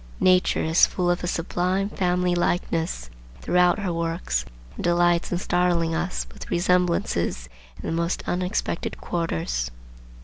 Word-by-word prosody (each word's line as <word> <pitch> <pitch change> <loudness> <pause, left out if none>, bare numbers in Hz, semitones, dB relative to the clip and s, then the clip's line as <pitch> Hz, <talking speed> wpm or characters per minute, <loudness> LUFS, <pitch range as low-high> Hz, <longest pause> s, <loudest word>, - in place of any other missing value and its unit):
Nature 185 0 +3
is 160 +2 +5
full 175 -1 0
of 175 - -2
a - - -1
sublime 180 +3 0
family 180 -3 0
likeness 165 - -1 0.3
throughout 180 - +3
her 195 -4 -2
works, 165 - -1 0.3
and - - -6
delights 175 0 +2
in 175 - +1
startling 175 -2 +1
us 175 +3 -2
with - - -10
resemblances 175 - +1 0.3
in - - -9
the 165 - -1
most 170 +2 -1
unexpected 180 -1 -2
quarters. 80 - -2
175 Hz, 135 wpm, -24 LUFS, 165-180 Hz, 0.3 s, is